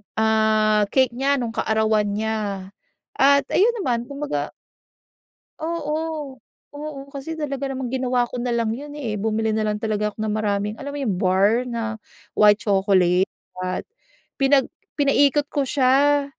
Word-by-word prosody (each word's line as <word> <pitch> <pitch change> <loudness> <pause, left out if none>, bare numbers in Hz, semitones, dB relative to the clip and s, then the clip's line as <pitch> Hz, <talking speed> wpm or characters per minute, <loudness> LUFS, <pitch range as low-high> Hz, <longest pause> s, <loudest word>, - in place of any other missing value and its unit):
ah 215 -1 +3
cake 260 -3 +4
nya 275 +2 +2
nung 235 -2 -2
kaarawan 215 -2 +1
niya 210 -3 -3 0.5
at 280 +1 +5
ayun 465 +5 +3
naman 240 -7 -1
kumbaga. 285 +1 -3 1.1
Oo, 310 -4 -3 0.3
oo 290 -1 -7
kasi 285 +4 -6
talaga 280 -3 -3
namang 260 -2 -4
ginawa 250 -1 +1
ko 240 0 -6
na 250 - -2
lang 230 -2 0
yun 290 +5 -7
eh, 220 -8 -3
bumili 220 0 0
nalang 215 -1 0
talaga 210 -1 -1
ako 210 - -10
ng 215 - -1
maraming 210 -1 -1
alam 285 0 -5
mo - - -4
yung 210 -8 0
bar 200 +7 +2
na 225 -2 -4 0.3
white 210 0 +4
chocolate 190 -2 +3 0.3
at 185 0 -3 0.6
pinag 270 0 +4 0.3
pinaikot 285 0 +3
ko 275 -3 0
siya 280 +2 +3
235 Hz, 145 wpm, -22 LUFS, 215-280 Hz, 1.1 s, at